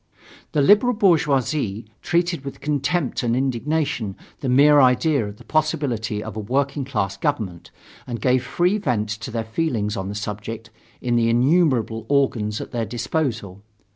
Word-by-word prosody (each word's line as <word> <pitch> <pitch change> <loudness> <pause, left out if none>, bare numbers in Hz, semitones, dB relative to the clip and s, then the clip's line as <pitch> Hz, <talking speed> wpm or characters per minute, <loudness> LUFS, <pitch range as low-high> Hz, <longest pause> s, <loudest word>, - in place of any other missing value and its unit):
The 145 - +3
liberal 210 - +5
bourgeoisie 145 - +1 0.2
treated 170 -3 0
with 140 - -7
contempt 150 +1 -1
and 120 -1 0
indignation 130 -4 -1 0.2
the 135 - -2
mere 145 +3 +6
idea 130 -1 +3
of 100 0 -9
the - - -15
possibility 125 -9 -1
of - - -7
a - - -4
working 140 +6 -1
class 100 -7 -2
government 100 - -3 0.4
and 120 -2 -4
gave 125 +3 +2
free 175 +10 +1
vent 120 - -1
to 110 +4 -5
their 115 -2 -3
feelings 110 -4 -1
on 95 0 -4
the 100 - -5
subject, 110 +3 -6 0.3
in 120 -1 +1
the 115 -1 +2
innumerable 120 -4 +2
organs 115 -7 +1
at - - -7
their 115 -2 -2
disposal. 115 - -3
125 Hz, 155 wpm, -22 LUFS, 110-150 Hz, 0.4 s, mere